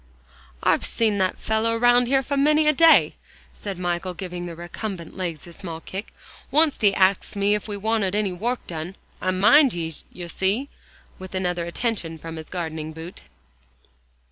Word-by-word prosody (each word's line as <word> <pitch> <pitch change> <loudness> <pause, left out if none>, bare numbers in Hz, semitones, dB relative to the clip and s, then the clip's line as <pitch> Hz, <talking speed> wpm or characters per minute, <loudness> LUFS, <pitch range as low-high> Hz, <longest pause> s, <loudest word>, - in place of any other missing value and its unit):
"I've - - +3
seen 215 -3 +1
that 185 -1 +1
fellow 225 +1 0
round 245 +1 +4
here 270 +1 +2
for 280 +3 -2
many 300 +2 +4
a 305 - +5
day," 330 +3 +5 0.4
said 200 -3 -6
Michael, 175 0 -2
giving 180 -1 -5
the 170 - -7
recumbent 175 +1 -6
legs 175 -5 -4
a 170 - -12
small 165 -2 -7
kick. 190 +5 -7 0.4
"Oncet 305 0 +3
he 205 -2 +5
axed 190 +2 +2
me 200 +1 +2
ef 210 +1 -2
we 205 -1 -4
wanted 205 -2 0
ony 210 -2 +1
wourk 235 +8 -3
done. 165 +2 -6 0.3
I 185 - 0
mind 225 +9 +5
yees, 165 -2 -3
yer 175 -1 -8
see," 200 +11 -1 0.5
with 185 0 -8
another 180 -2 -1
attention 170 -4 -2
from 165 +1 -8
his 160 - -9
gardening 160 -3 -4
boot. 165 +3 -9
190 Hz, 170 wpm, -24 LUFS, 175-225 Hz, 0.5 s, a